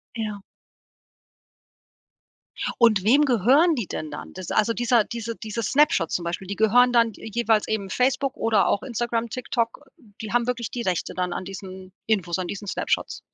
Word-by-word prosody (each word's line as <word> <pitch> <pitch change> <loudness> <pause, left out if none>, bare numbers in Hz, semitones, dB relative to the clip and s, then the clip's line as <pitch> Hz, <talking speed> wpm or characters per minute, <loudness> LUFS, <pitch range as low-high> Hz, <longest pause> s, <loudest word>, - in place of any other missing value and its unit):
Ja. 215 -3 -4 2.4
Und 220 -5 +4
wem 275 +8 +5
gehören 270 - +4
die 235 -8 -3
denn 155 -1 -5
dann? 150 - -8
Das 185 -1 -7
also 215 +1 +2
dieser 240 -1 +3
diese 230 +1 -5
dieses 220 0 -4
Snapshot 260 - +3
zum 175 - -1
Beispiel, 175 +2 -4
die 200 - -4
gehören 240 +4 +4
dann 230 -1 +4
d 220 - -9
jeweils 225 -2 +2
eben 200 -3 -2
Facebook 265 +5 0
oder 220 -3 +2
auch 200 - +1
Instagram, 235 -1 -2
TikTok, 240 +3 -3 0.3
die 215 -2 -6
haben 240 0 +2
wirklich 240 -2 -2
die 245 - -4
Rechte 185 -6 -2
dann 180 0 -2
an - - -4
diesen 190 -1 -9 0.2
Infos, 190 -5 0
an 180 - -3
diesen 205 +2 -6
Snapshots. - - -2
220 Hz, 170 wpm, -24 LUFS, 195-240 Hz, 2.4 s, wem